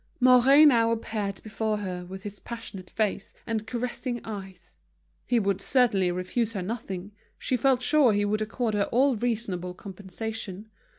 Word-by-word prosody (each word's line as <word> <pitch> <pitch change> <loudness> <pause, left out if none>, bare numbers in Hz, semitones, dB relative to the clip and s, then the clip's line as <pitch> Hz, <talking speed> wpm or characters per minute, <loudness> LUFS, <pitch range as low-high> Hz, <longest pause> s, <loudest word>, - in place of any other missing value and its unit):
Mouret 255 +4 +7
now 230 -6 +5
appeared 215 -3 -3
before 215 0 -2
her 180 -3 -5
with 190 +1 -8
his 205 -1 -7
passionate 225 -6 -8
face 210 -2 -2
and 220 -1 -2
caressing 245 +1 -3
eyes. 190 - -9 0.5
He 240 - +3
would 200 -2 0
certainly 215 -7 +3
refuse 195 +6 -1
her 195 -4 -3
nothing; 195 -2 -5 0.3
she 255 - -1
felt 255 0 +2
sure 290 -3 +5
he 205 0 +1
would 215 +1 0
accord 225 +1 -1
her 205 -1 +2
all 265 +2 +3
reasonable 205 -6 -2
compensation. 205 +2 -7
215 Hz, 155 wpm, -27 LUFS, 195-240 Hz, 0.5 s, Mouret